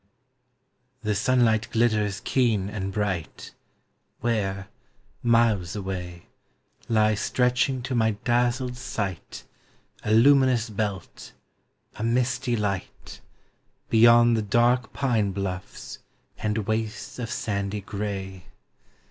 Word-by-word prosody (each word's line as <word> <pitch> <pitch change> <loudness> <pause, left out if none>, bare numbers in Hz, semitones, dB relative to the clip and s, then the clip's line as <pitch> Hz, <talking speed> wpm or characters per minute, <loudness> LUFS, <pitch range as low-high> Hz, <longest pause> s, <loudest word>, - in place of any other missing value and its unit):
The 105 -1 0
sunlight 110 +1 +2
glitters 105 -3 +1
keen 110 -7 +1
and 95 -2 -4
bright, 95 -5 -3 0.7
Where, 95 -5 -1 0.5
miles 115 -7 +2
away, 90 -3 -5 0.6
Lies 110 -2 +3
stretching 125 +1 +1
to 130 - -3
my 110 -2 +2
dazzled 125 +1 0
sight 105 -8 -5 0.6
A 105 - -1
luminous 125 -1 +4
belt, 100 -3 -5 0.6
a 105 - -4
misty 125 +1 0
light, 100 -4 -4 0.7
Beyond 120 +1 +6
the 110 - 0
dark 120 +4 +2
pine 115 -8 0
bluffs 95 -1 -6 0.4
and 105 -1 -1
wastes 110 +2 -3
of 115 -2 -4
sandy 100 -3 -3
gray. 95 -2 -5
110 Hz, 95 wpm, -25 LUFS, 100-120 Hz, 0.7 s, Beyond